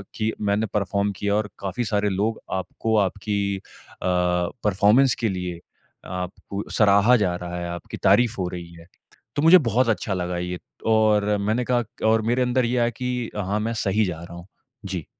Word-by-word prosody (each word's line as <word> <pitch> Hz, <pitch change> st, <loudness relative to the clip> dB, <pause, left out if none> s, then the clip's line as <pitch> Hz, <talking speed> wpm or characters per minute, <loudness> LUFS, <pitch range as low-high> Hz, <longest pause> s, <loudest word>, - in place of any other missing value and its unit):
कि 110 Hz, 0 st, 0 dB, 0.2 s
मैंने 105 Hz, +2 st, +1 dB
परफ़ॉर्म 100 Hz, 0 st, 0 dB
किया 100 Hz, 0 st, 0 dB
और 105 Hz, -1 st, -1 dB
काफ़ी 100 Hz, +5 st, -3 dB
सारे 105 Hz, -1 st, +1 dB
लोग 105 Hz, +4 st, -1 dB, 0.2 s
आपको 110 Hz, +5 st, -2 dB
आपकी 100 Hz, 0 st, 0 dB
अ, -, -, -11 dB, 0.4 s
परफ़ॉर्मेंस 95 Hz, +7 st, +2 dB
के 115 Hz, -3 st, +1 dB
लिए 90 Hz, -2 st, -4 dB, 0.5 s
आपको 90 Hz, +2 st, -5 dB
सराहा 105 Hz, +3 st, +5 dB
जा 90 Hz, -4 st, 0 dB
रहा 90 Hz, 0 st, -6 dB
है, 85 Hz, -, -4 dB
आपकी 85 Hz, 0 st, -7 dB
तारीफ 120 Hz, -3 st, +4 dB
हो 90 Hz, -, 0 dB
रही 85 Hz, -1 st, -8 dB
है। 85 Hz, 0 st, -14 dB, 0.5 s
तो -, -, +2 dB
मुझे 175 Hz, +3 st, +9 dB
बहुत 120 Hz, +2 st, +2 dB
अच्छा 105 Hz, -2 st, 0 dB
लगा 90 Hz, -1 st, -2 dB
ये 90 Hz, 0 st, -4 dB, 0.3 s
और 105 Hz, -1 st, +3 dB
मैंने 110 Hz, +4 st, 0 dB
कहा 120 Hz, -1 st, +2 dB
क 110 Hz, -, -15 dB
और 110 Hz, 0 st, +4 dB
मेरे 125 Hz, +2 st, +2 dB
अंदर 125 Hz, 0 st, +1 dB
ये 125 Hz, +1 st, 0 dB
आया 120 Hz, 0 st, +3 dB
कि 125 Hz, 0 st, -3 dB
अ, -, -, -3 dB
हाँ, 100 Hz, +3 st, -1 dB
मैं 115 Hz, +2 st, -2 dB
सही 105 Hz, 0 st, +1 dB
जा 85 Hz, -3 st, -4 dB
रहा 85 Hz, 0 st, -10 dB
हूँ। 85 Hz, +2 st, -11 dB, 0.4 s
जी। 90 Hz, -5 st, -4 dB
105 Hz, 190 wpm, -23 LUFS, 90-115 Hz, 0.5 s, मुझे